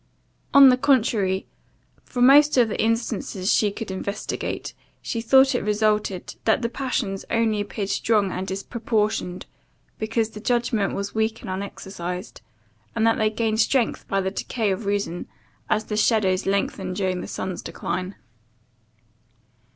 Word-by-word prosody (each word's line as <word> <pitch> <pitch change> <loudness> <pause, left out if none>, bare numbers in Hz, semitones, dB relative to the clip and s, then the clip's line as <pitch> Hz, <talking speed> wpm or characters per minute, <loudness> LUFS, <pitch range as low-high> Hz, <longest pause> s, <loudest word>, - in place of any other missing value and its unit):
On 280 -1 +9
the 250 - +4
contrary, 220 -8 +2 0.6
from 245 -1 +1
most 290 +2 +6
of 240 -3 +5
the - - -2
instances 225 -4 0
she 210 - +3
could 215 -1 -6
investigate, 200 +2 -4 0.3
she 230 - -3
thought 265 +3 +5
it 245 - 0
resulted, 210 -2 0
that 220 +2 +2
the 235 - 0
passions 235 -7 -2
only 225 -2 +1
appeared 205 -1 -4
strong 205 -2 +1
and 185 +2 -4
disproportioned, 210 -2 -2 0.5
because 220 0 -1
the 210 - -9
judgment 235 -3 0
was 200 0 -4
weak 220 +1 -1
and - - -6
unexercised; 185 -1 -6 0.5
and 225 -1 +2
that 225 - +3
they 215 -1 +3
gained 220 0 -1
strength 240 +1 +1
by 195 - 0
the 190 0 -1
decay 215 +1 -2
of 200 +2 -3
reason, 200 -4 -2 0.4
as 215 0 +1
the 210 - -3
shadows 200 -4 +2
lengthen 195 -1 -1
during 185 -2 -1
the - - -6
sun's 185 -1 -4
decline. 185 +2 -4
215 Hz, 145 wpm, -24 LUFS, 195-230 Hz, 0.6 s, On